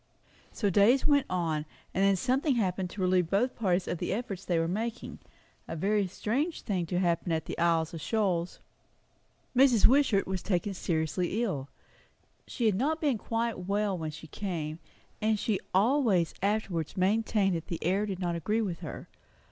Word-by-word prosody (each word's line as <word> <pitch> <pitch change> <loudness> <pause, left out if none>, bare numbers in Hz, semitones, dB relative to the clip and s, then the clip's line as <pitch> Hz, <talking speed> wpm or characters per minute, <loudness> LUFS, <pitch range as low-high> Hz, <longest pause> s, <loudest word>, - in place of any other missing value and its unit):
So 205 -4 0
days 215 +8 +4
went 285 -2 +3
on. 165 -4 -1 0.3
And 195 - +1
then 195 0 +4
something 260 - +1
happened 185 -4 0
to 195 - -7
relieve 180 -2 +2
both 225 +7 +1
parties 185 -4 0
of 170 - -2
the - - -2
efforts 200 -4 -4
they 175 - 0
were 165 0 +1
making; 225 +6 -4 0.5
a - - -5
very 200 +4 +1
strange 265 - -2
thing 185 -5 -1
to 175 - -1
happen 175 -1 +1
at 160 -1 -1
the - - -5
Isles 165 -1 +2
of 165 - -6
Shoals. 185 -4 0 1.0
Mrs. 250 -4 +5
Wishart 255 -6 +4
was 190 -1 -3
taken 195 0 -1
seriously 175 +5 -1
ill. 145 - -3 0.8
She 240 - -2
had 215 - +4
not 290 - 0
been 280 -8 +1
quite 230 -1 -2
well 200 0 +1
when 160 -3 -4
she 155 +1 -9
came; 160 -3 -4 0.4
and 215 0 +2
she 210 -2 0
always 205 - +3
afterwards 195 -6 -1
maintained 200 0 +2
that 165 - -5
the 170 - -4
air 195 +5 +1
did 195 -3 -3
not 175 -2 -1
agree 215 +7 0
with 180 -5 -3
her. 165 -4 -7
195 Hz, 175 wpm, -29 LUFS, 175-220 Hz, 1.0 s, Mrs